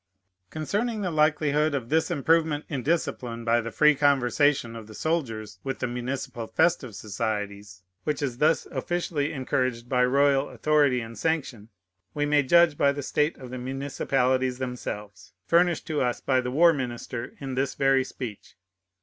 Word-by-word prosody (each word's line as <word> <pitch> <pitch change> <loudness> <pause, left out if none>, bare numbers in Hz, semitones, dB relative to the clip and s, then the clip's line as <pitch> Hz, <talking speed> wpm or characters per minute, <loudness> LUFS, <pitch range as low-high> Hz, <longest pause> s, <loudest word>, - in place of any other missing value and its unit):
Concerning 210 +8 -2
the 185 -3 -1
likelihood 150 -1 +2
of 120 -4 -4
this 160 +1 +2
improvement 160 -1 +1
in 140 -5 -3
discipline 125 -6 -2
by 120 +1 +3
the 115 - -5
free 150 +5 +5
conversation 140 -3 +2
of 110 -2 -9
the 110 - -11
soldiers 110 - -3
with 135 -1 -3
the - - -2
municipal 120 -1 -4
festive 160 - +1
societies, 100 -2 -4 0.2
which 150 -2 -1
is 130 -4 -3
thus 155 +2 +3
officially 165 -4 -2
encouraged 130 -3 -1
by 125 -1 +2
royal 140 +2 +3
authority 145 -5 +2
and 115 -2 -9
sanction, 135 -9 -2 0.5
we 145 0 0
may 145 0 +3
judge 165 +2 +4
by 140 - +4
the 140 0 -5
state 150 +4 0
of 130 -3 -10
the 130 - -5
municipalities 130 -1 0
themselves, 115 -6 -6
furnished 175 0 +2
to 155 -2 -1
us 125 -2 0
by 130 -1 +1
the 125 - -3
war 165 +6 +5
minister 120 -3 -5
in 135 -2 -5
this 135 +1 -1
very 135 -1 +3
speech. 120 -5 -8
135 Hz, 160 wpm, -26 LUFS, 120-150 Hz, 0.5 s, free